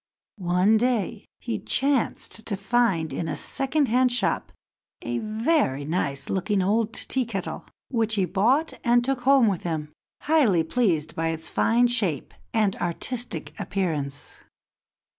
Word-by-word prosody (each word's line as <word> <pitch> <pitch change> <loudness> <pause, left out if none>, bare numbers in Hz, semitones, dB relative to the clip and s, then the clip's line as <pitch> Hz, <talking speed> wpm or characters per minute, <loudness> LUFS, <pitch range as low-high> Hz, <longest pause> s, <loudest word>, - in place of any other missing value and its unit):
One 180 +4 +3
day 225 -3 -1
he 230 -4 -3
chanced 265 -1 0
to 200 - -1
find 195 -6 +1
in 165 - -3
a - - -2
second 275 +1 0
hand 250 +2 +3
shop 245 - 0 0.5
a - - -2
very 215 - 0
nice 140 -4 -2
looking 195 +1 0
old 215 +3 +1
Tea 265 - -1
kettle, 205 -6 -5 0.2
which 225 -3 0
he 195 -3 +2
bought 235 - +1
and 240 0 +3
took 270 -1 -1
home 270 -1 +5
with 195 -5 0
him, 155 -3 -4 0.3
highly 255 - +3
pleased 165 -5 0
by 165 0 -1
its 160 0 -2
fine 235 +2 +3
shape 215 - 0 0.2
and 205 -3 +1
artistic 240 +8 -3
appearance. 150 -8 -3
215 Hz, 140 wpm, -25 LUFS, 175-245 Hz, 0.5 s, home